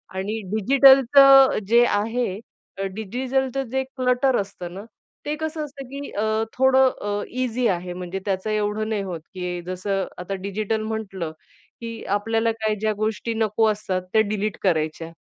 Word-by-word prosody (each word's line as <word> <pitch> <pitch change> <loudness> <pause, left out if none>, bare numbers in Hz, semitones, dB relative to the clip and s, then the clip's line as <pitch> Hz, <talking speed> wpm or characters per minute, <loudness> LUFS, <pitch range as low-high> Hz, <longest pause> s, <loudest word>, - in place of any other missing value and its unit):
आणि 205 +4 -3 0.2
डिजिटलचं 270 +3 +7
जे 235 +2 +6
आहे 225 +4 0 0.5
अ, - - -1
डिजिटलचं 260 +5 -2
जे 265 0 0
क्लटर 255 0 +1
असतं 185 -3 -8
ना, 195 - -8 0.4
ते 300 +1 -1
कसं 315 0 -4
असतं, 275 -2 -10
की 280 +2 -7
अ, 220 +1 0
थोडं 265 0 +5
अ, 205 0 -2 0.2
ईझी 250 -1 0
आहे. 180 -1 -2
म्हणजे 180 +1 -5
त्याचं 195 +1 -2
एवढं 215 0 -1
नाही 215 -2 -1
होत, 175 -4 -5
की 180 -1 -4
जसं 190 +1 -2 0.2
आता 180 +2 -5
डिजिटल 215 +2 -2
म्हटलं, 200 -7 -4 0.5
की 230 -1 -6
आपल्याला 225 +2 0
काही 220 -1 -1
ज्या 215 -1 +1
गोष्टी 220 +2 -2
नको 220 0 +1
असतात 195 -3 -3
त्या 220 - +5
डिलीट 210 0 -2
करायच्या. 160 -2 0
220 Hz, 155 wpm, -23 LUFS, 195-255 Hz, 0.5 s, डिजिटलचं